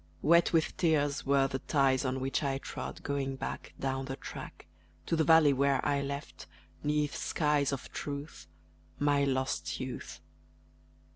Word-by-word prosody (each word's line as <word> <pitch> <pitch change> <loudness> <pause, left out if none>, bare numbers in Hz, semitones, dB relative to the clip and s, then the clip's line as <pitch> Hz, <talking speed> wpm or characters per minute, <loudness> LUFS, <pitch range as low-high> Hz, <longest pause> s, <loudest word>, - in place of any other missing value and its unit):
Wet 170 +2 +5
with 165 -2 +1
tears 145 -5 +1
Were 140 -1 +4
the 135 0 -3
ties 135 -1 +2
on 130 +1 -1
which 135 +1 -1
I 135 -2 0
trod, - - -7
going 140 -1 -2
back - - -6
Down 135 0 -2
the 135 0 -4
track - - -9 0.4
To - - 0
the 160 - +3
valley 160 -2 +6
where 140 0 +2
I 140 -1 +2
left, 140 +1 -6 0.4
'neath 150 0 0
skies 150 -3 +1
of 140 - -5
Truth, 140 - -6 0.5
My 145 -1 +2
lost 130 -1 -1
youth. 130 -1 -6
140 Hz, 150 wpm, -31 LUFS, 135-150 Hz, 0.5 s, valley